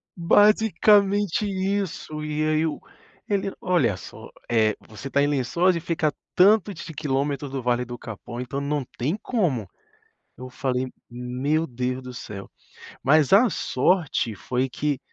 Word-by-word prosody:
Basicamente 205 +1 +4
isso 190 -5 -2
e 155 0 -2
aí 155 0 +2
eu 160 -2 -1 0.5
ele: 200 -1 0
"Olha 140 - +1
só, 80 - -11 0.2
eh, 110 -2 +3
você 110 +6 -8
tá 140 - +2
em 145 - +3
Lençóis 145 +7 +2
e - - -1
fica 165 -1 0
a - - -6 0.2
tanto 205 +2 +5
de 165 -2 -8
quilômetros 140 0 -2
do 135 -1 -3
Vale 125 0 +1
do 120 0 -7
Capão. 120 +1 -8
Então 125 +3 -4
não 145 0 -1
tem 140 +9 0
como". 165 - -1 0.7
Eu 130 0 -8
falei: 130 0 -2 0.2
"Meu 125 +6 -1
Deus 125 -1 -3
do 125 0 -8
céu". 100 -4 -8 0.5
Mas 145 +1 +4
a 225 +5 +7
sorte 140 - 0
foi 125 +6 -1
que 145 +1 -2
145 Hz, 150 wpm, -24 LUFS, 125-180 Hz, 0.7 s, a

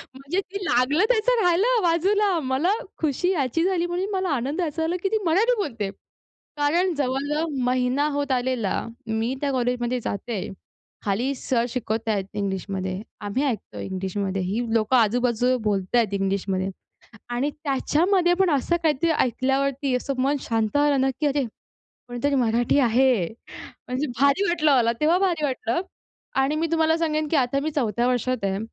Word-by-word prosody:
म्हणजे 280 +8 -3
ते 395 +1 -7
लागलं 275 - +3
त्याचं 480 0 +3
राहिलं 410 +7 +3
बाजूला. 370 +2 +2
मला 270 +7 0 0.3
खुशी 320 +5 +1
याची 300 -1 0
झाली 360 -2 +1
म्हणून 360 +3 -2
मला 375 -2 0
आनंद 275 +8 -3
याचा 320 -1 -2
झाला, 335 +2 0
की 390 - +1
ती 440 - +1
मराठी 415 +10 +3
बोलते. 230 - -2 0.7
कारण 340 +5 +2
जवळ-जवळ 285 +3 -1 0.2
महिना 255 +3 +1
होत 285 -1 -1
आलेला 250 -5 0 0.3
मी 225 +3 -1
त्या 285 -1 0
कॉलेजमध्ये 245 -1 0
जाते. 205 -1 -3 0.6
खाली 230 +7 0
सर 240 -2 0
शिकवतायेत 220 -4 -2
इंग्लिशमध्ये. 190 -1 -3 0.2
आम्ही 205 +7 -1
ऐकतो 235 -7 -3
इंग्लिशमध्ये. 190 0 -3
ही 200 +6 -1
लोकं 225 +3 +2
आजू-बाजू 245 +2 +2
बोलतायेत 205 +2 +1
इंग्लिशमध्ये. 195 -1 -1 0.6
आणि 250 +4 0
त्याच्यामध्ये 330 +6 +1
पण 375 - +4
असं 300 +4 +1
काहीतरी 320 +1 +2
ऐकल्यावरती 270 0 0
असं 275 +2 -3
मन 280 +2 +2
शांत 225 -2 0
झालं 290 -2 +3
ना, 265 0 +2
की 300 - +2
अरे 285 -1 +1 0.6
कोणीतरी 245 +4 -1
मराठी 240 +2 +2
आहे! 245 -5 +3 0.6
म्हणजे 255 +4 -1
भारी 280 +8 +3
वाटलं 310 -4 +3
मला, 235 -1 +3
तेव्हा 325 +4 +4
भारी 350 -6 +1
वाटलं. 255 -1 -1 0.6
आणि 275 +3 +1
मी 325 +2 0
तुम्हाला 320 0 +3
सांगेन, 310 -2 0
की 320 - +1
आता 275 0 +1
मी 310 +2 -2
चौथ्या 240 -5 0
वर्षात 250 -2 0
आहे. 195 0 0
270 Hz, 150 wpm, -24 LUFS, 235-320 Hz, 0.7 s, पण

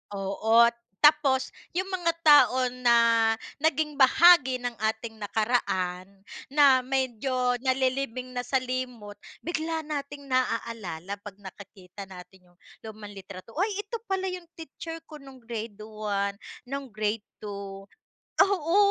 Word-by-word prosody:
Oo, 220 +4 +3 0.3
tapos 285 -3 +4 0.2
yung 370 +2 0
mga 350 -3 0
tao 260 -4 +6
na 250 -1 +3 0.6
naging 300 -1 0
bahagi 280 -1 +6
ng 245 -1 -3
ating 220 +1 -3
nakaraan 200 -4 -1 0.4
na 280 -2 +5
medyo 255 -1 -1
nalilibing 260 -1 -1
na - - -1
sa 250 +2 -3
limot 250 -5 -5 0.3
bigla 320 -1 -2
nating 285 -1 -5
naaalala 220 -8 -2
'pag 205 -1 -10
nakikita 190 0 -11
natin 180 0 -14
yung 175 - -32 0.3
lumang 215 -1 -9
litrato 195 +1 -11
"Uy 375 +7 +1
ito 420 +3 -5
pala 380 0 0
yung 360 -2 -7
teacher 325 +1 -8
ko 305 -2 -11
nung 270 -1 -13
grade 225 -2 -6
1, 205 -2 -3 0.3
nung 275 +2 -5
grade 215 0 -2 0.2
2," 200 -1 -7 0.5
oo 370 -3 +3
250 Hz, 125 wpm, -27 LUFS, 210-285 Hz, 0.6 s, tao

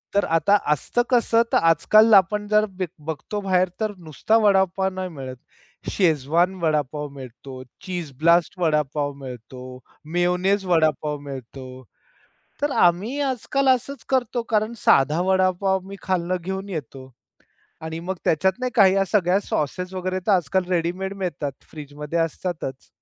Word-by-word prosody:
तर 200 - +3
आता 200 +5 +4 0.2
असतं 150 - -1
कसं 235 -2 +3
तर - - +6
आजकाल 215 +7 +4
आपण 205 +2 +4
जर 210 0 +3
बघ 185 - +1 0.2
बघतो 160 +7 -4
बाहेर 185 -2 +2
तर 215 -1 -1
नुसता 170 - 0
वडापाव 190 -1 +3
नाही 185 0 -4
मिळत, 135 -5 -8 0.6
शेजवान 170 +1 +2
वडापाव 150 -2 -1
मिळतो, 130 0 -10 0.2
चीज 175 -5 -5
ब्लास्ट 170 +2 +3
वडापाव 150 -3 0
मिळतो, 125 +1 -9 0.3
मेयोनेज 180 +3 +1
वडापाव 155 -4 +1
मिळतो. 130 -1 -9 0.8
तर 290 0 0
आम्ही 190 +11 +2
आजकाल 270 0 -1
असंच 260 +2 +1
करतो 245 -2 0
कारण 215 +1 +1
साधा 150 -3 +3
वडापाव 190 +1 +1
मी 200 - -7
खालनं 185 -1 -1
घेऊन 190 +2 -5
येतो 135 -6 -7 0.7
आणि 160 +1 -6
मग 190 - -1
त्याच्यात 190 +4 +2
नाही 255 0 -1
काही 195 -4 +6
या 195 0 +2
सगळ्या 190 -2 +3
सॉसेस 180 +1 -3
वगैरे 185 0 -2
तर 210 - +4
आजकाल 185 0 +1
रेडीमेड 180 +2 -1
मिळतात, 175 -7 -3 0.2
फ्रिजमध्ये 150 +1 -6
असतातच. 165 -4 -3
180 Hz, 140 wpm, -23 LUFS, 150-195 Hz, 0.8 s, तर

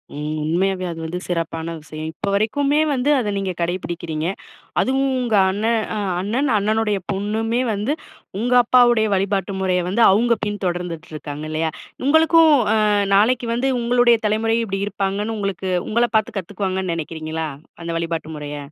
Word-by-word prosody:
ம். 150 +1 -3
உண்மையாவே 185 +4 0
அது 165 - -7
வந்து 175 +3 -4
சிறப்பான 165 -1 -3
விஷயம். 155 +1 -7
இப்போ 200 +6 -4
வரைக்குமே 280 +8 +1
வந்து, 265 +1 0
அத 220 -4 -1
நீங்க 195 -1 -2
கடைப்பிடிக்கிறீங்க. 170 -2 -3 0.5
அதுவும் 270 +1 +1
உங்க 240 -3 0 0.2
அண்ணன் 220 +4 +1 0.2
அ - - -2 0.2
அண்ணன், 245 +8 0
அண்ணனுடைய 210 0 +1
பொண்ணுமே 220 +4 -1
வந்து, 210 +8 -1 0.5
உங்க 245 +3 0
அப்பாவுடைய 240 -2 +4
வழிபாட்டு 195 0 -1
முறைய 185 -1 +1
வந்து 195 +6 0
அவுங்க 235 +4 +3
பின் 205 0 -4
தொடர்ந்துட்டு 175 -2 -3
இருக்காங்க 150 0 -6
இல்லயா! 160 +1 -1 0.3
உங்களுக்கும், 320 +1 +5 0.2
அ 220 - +3 0.4
நாளைக்கு 235 +4 +3
வந்து 250 +3 0
உங்களுடைய 240 0 +4
தலைமுறை 225 +2 +1
இப்பிடி 195 -2 -3
இருப்பாங்கன்னு, 205 +2 -2
உங்களுக்கு 195 -2 -3 0.2
உங்கள 235 +2 +2
பாத்து 215 -1 +1
கத்துக்குவாங்கன்னு 190 -1 -3
நெனைக்கிறீங்களா? 160 0 -4 0.4
அந்த 170 - -4
வழிபாட்டு 165 -1 -3
முறைய. 150 0 -6
200 Hz, 145 wpm, -21 LUFS, 170-230 Hz, 0.5 s, உங்களுக்கும்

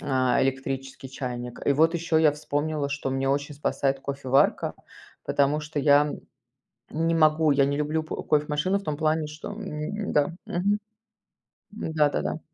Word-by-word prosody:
а, 130 -3 +1
электрический 135 0 -3
чайник. 125 -2 -5
И - - +5
вот 160 +4 +3
ещё 170 -1 0
я 160 -1 +5
вспомнила, 150 0 -2
что 140 -1 -3
меня 135 0 -1
очень 145 +1 -1
спасает 135 -1 0
кофеварка, 135 0 +1 0.5
потому 145 +1 +2
что 150 -1 -3
я 145 +1 +4 0.8
не 165 +2 0
могу, 155 -1 +4
я 140 -1 +4
не 140 +1 0
люблю 150 +2 0
п 155 - -6
кофе-машину 150 +5 +1
в 200 - -11
том 150 -2 -2
плане, 155 0 +1
что, 150 +5 -8
м 205 0 -4
Да, 145 +2 +2
мгм. 200 +4 0 0.9
Да-да-да. 160 -6 0
150 Hz, 150 wpm, -26 LUFS, 140-160 Hz, 0.9 s, И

